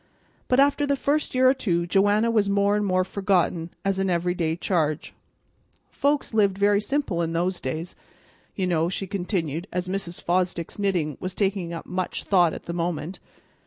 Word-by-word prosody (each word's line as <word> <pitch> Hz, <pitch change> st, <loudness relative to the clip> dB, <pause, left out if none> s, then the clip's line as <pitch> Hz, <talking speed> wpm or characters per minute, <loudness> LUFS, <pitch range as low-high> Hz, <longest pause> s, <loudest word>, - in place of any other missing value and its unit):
But 255 Hz, -, +3 dB
after 285 Hz, +1 st, +3 dB
the 280 Hz, -, +2 dB
first 285 Hz, +1 st, -1 dB
year 255 Hz, 0 st, +5 dB
or 260 Hz, -, +6 dB
two 175 Hz, -10 st, 0 dB
Joanna 205 Hz, +5 st, +3 dB
was 210 Hz, -3 st, +2 dB
more 200 Hz, +1 st, +2 dB
and 210 Hz, -, +1 dB
more 185 Hz, -2 st, +2 dB
forgotten 185 Hz, -3 st, 0 dB, 0.2 s
as 195 Hz, -1 st, +1 dB
an 195 Hz, 0 st, +1 dB
every 175 Hz, 0 st, +1 dB
day 165 Hz, -3 st, -1 dB
charge. 160 Hz, -4 st, -1 dB, 0.8 s
Folks 285 Hz, -3 st, 0 dB
lived 200 Hz, -3 st, +3 dB
very 205 Hz, 0 st, +3 dB
simple 240 Hz, -8 st, -1 dB
in 165 Hz, 0 st, -1 dB
those 175 Hz, +2 st, -1 dB
days, 155 Hz, +7 st, -4 dB, 0.6 s
you 190 Hz, -, -1 dB
know," 170 Hz, -2 st, +1 dB
she 195 Hz, +1 st, -3 dB
continued, 175 Hz, -4 st, -2 dB
as 180 Hz, 0 st, -2 dB
Mrs. 185 Hz, -2 st, -3 dB
Fosdick's 180 Hz, 0 st, -1 dB
knitting 175 Hz, -8 st, 0 dB
was 185 Hz, 0 st, -5 dB
taking 190 Hz, -4 st, -1 dB
much 185 Hz, 0 st, -3 dB
thought 175 Hz, -4 st, +4 dB
at -, -, -8 dB
the 170 Hz, -, -5 dB
moment. 170 Hz, 0 st, -3 dB
185 Hz, 175 wpm, -25 LUFS, 170-205 Hz, 0.8 s, or